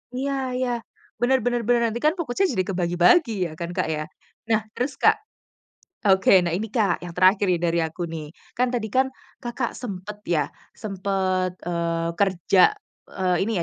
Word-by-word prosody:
iya 275 +2 -1 0.2
iya, 255 -1 0 0.5
bener 260 +1 +3
bener 240 -1 +1
bener, 240 -1 +4
nanti 235 - -4
kan 305 +2 +3
fokusnya 340 +2 0
jadi 185 - +2
kebagi-bagi 180 - +3 0.2
ya - - -9
kan, 170 0 -4
Kak, - - +1
ya? 155 -1 -2 0.4
Nah 220 -1 +3 0.2
terus 265 +3 -1
Kak - - +4 0.9
oke, 190 0 +5
nah 170 - 0
ini 215 +5 -1
Kak 205 -6 +1
yang 175 -1 -7
terakhir 190 +2 +4
ini 175 - +3
dari 170 0 +1
aku, 160 +2 -3
nih. 160 -2 -6 0.2
Kan 250 +1 +1
tadi 235 -3 -2
kan 260 +1 +3 0.3
Kakak 240 0 -3
sempet 205 -3 -7
ya 155 -5 +2 0.3
sempet, 190 -2 -1
eee, 170 -1 -1
kerja, 195 - +4 0.3
eee, 185 -2 0
ini 225 - -1
195 Hz, 165 wpm, -24 LUFS, 175-240 Hz, 0.9 s, oke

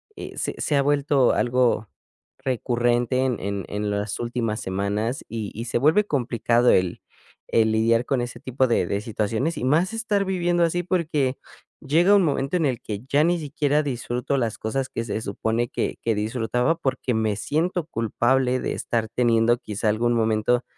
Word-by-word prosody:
eh, - - -8
se - - -2
se 150 - 0
ha 140 - +4
vuelto 145 -2 +3
algo 120 -4 +1 0.5
recurrente 120 -1 0
en 125 -5 -1
en 100 0 -3
en 105 0 -3
las 100 0 -2
últimas 120 -2 -2
semanas 100 +6 -2
y 110 -3 -5
y 115 +2 -5
se 120 - -1
vuelve 160 - +4
complicado 120 - +1
el 90 -1 +2 0.5
el 110 -1 +3
lidiar 115 +2 +2
con 130 -3 0
ese 120 0 -5
tipo 130 +1 0
de 115 -6 +2
de 100 +3 -2
situaciones, 115 +8 -2
y - - -4
más 165 - +2
estar 215 -3 0
viviendo 175 -2 +1
así, 175 +1 +1
porque 155 -7 0 0.4
llega 170 +8 +4
un 195 - +5
momento 145 +2 0
en 160 - +1
el 125 -4 -1
que 105 -1 -5
ya 145 +3 +3
ni 175 +1 +2
siquiera 150 0 0
disfruto 125 0 -2
las 115 -4 -1
cosas 130 +4 -2
que 115 - -3
se 110 -1 -3
supone 110 +4 -1
que - - -2
que 115 - +1
disfrutaba 125 +7 0
porque 130 -2 -1
me 110 -2 0
siento 160 - -1
culpable 125 +2 +1
de - - -2
estar 115 -2 -2
teniendo 120 -1 +3
quizá 105 -2 -2
algún 120 +3 +1
momento 110 +2 +1
120 Hz, 175 wpm, -24 LUFS, 110-145 Hz, 0.5 s, un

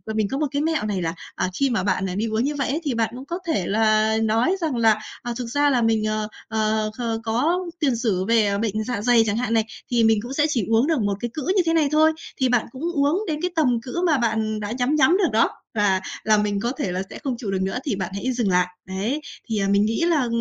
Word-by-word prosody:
mình 215 -2 +1
có 270 - -1
một 300 +1 0
cái 285 - 0
mẹo 315 -6 0
này 200 -3 -1
là, 165 -1 -2 0.2
à, - - -1
khi 275 - +3
mà 230 -6 0
bạn 195 -1 0
đi 215 - 0
uống 220 +1 0
như 290 +2 -1
vậy 275 -3 -1
ấy, 300 +5 -1
thì 285 -4 -1
bạn 230 -1 0
cũng 260 +2 -8
có 340 +5 -4
thể 200 - 0
là 215 +1 +2
nói 225 - +2
rằng 315 -6 -1
là, 225 -2 +3 0.2
à, 240 - -4
thực 250 - -4
ra 290 +4 +2
là 255 -3 +2
mình, 225 -1 +2
ờ, 215 0 -1 0.2
ờ, 215 -1 0
ờ, 230 -2 -2
có 245 +11 +1 0.2
tiền 280 -6 +2
sử 210 -6 0
về 215 -2 +2
bệnh 215 0 -1
dạ 225 -2 -3
dày 235 0 +4
chẳng 210 0 0
hạn 235 -1 -1
này, 225 -1 +2 0.3
thì 235 -1 +3
mình 220 -1 +4
cũng 245 +4 -7
sẽ 295 +1 +2
chỉ 235 -9 0
uống 225 +4 +3
được 320 -4 +1
một 200 -1 0
cái 240 - -3
cữ 305 - -4
như 385 - +5
thế 330 - +2
này 320 -3 +3
thôi, 310 +1 +5 0.3
thì 260 -1 +2
bạn 245 -2 +2
cũng 260 +4 -9
uống 300 +6 +1
đến 305 -2 -2
cái 360 - -1
tầm 250 -8 +2
cữ 265 +9 -4
mà 310 -4 +3
bạn 220 -2 0
đã 205 0 -4
nhắm 250 +4 0
nhắm 305 +5 +4
được 390 -3 +2
đó 225 - +4 0.2
là 200 -3 +2 0.2
là 215 -1 +4
mình 205 -1 0
có 235 +4 -1
thể 185 - -2
là 180 +1 -2
sẽ - - -9
không 265 -3 -1
chịu 215 -4 -4
được 190 -1 -1
nữa 190 +4 -1
thì 275 -8 -1
bạn 190 -2 -3
hãy 250 +6 -2
dừng 235 -5 0
lại. 180 0 +3 0.2
Đấy. 205 +10 -2 0.3
Thì, 220 -2 0
à, 195 - +1
mình 200 +1 +3
nghĩ 225 +8 -1
là 310 -7 +2
230 Hz, 275 wpm, -23 LUFS, 215-275 Hz, 0.3 s, như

